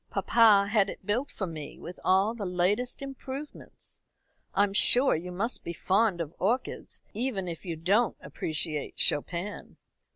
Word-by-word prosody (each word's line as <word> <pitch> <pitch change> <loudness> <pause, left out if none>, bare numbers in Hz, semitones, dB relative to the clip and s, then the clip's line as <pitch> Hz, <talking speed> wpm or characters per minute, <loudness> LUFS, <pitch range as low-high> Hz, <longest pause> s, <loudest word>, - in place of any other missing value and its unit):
Papa 210 -4 +4
had 205 -3 +3
it - - -9
built 240 +8 -1
for 195 - -4
me 155 -4 -8
with 175 - -9
all 195 +4 +3
the 230 -3 -6
latest 195 +9 -1
improvements. 275 +1 -9 0.6
I'm 200 -1 +2
sure 250 +6 +6
you 175 +3 -5
must 210 +7 -2
be 170 - -5
fond 195 +1 +1
of 165 -1 -4
orchids, 240 +7 -2
even 220 -5 -2
if 170 +1 -7
you 170 -2 -4
don't 200 +8 +1
appreciate 150 +1 -3
Chopin." 175 +7 -1
195 Hz, 150 wpm, -28 LUFS, 175-230 Hz, 0.6 s, sure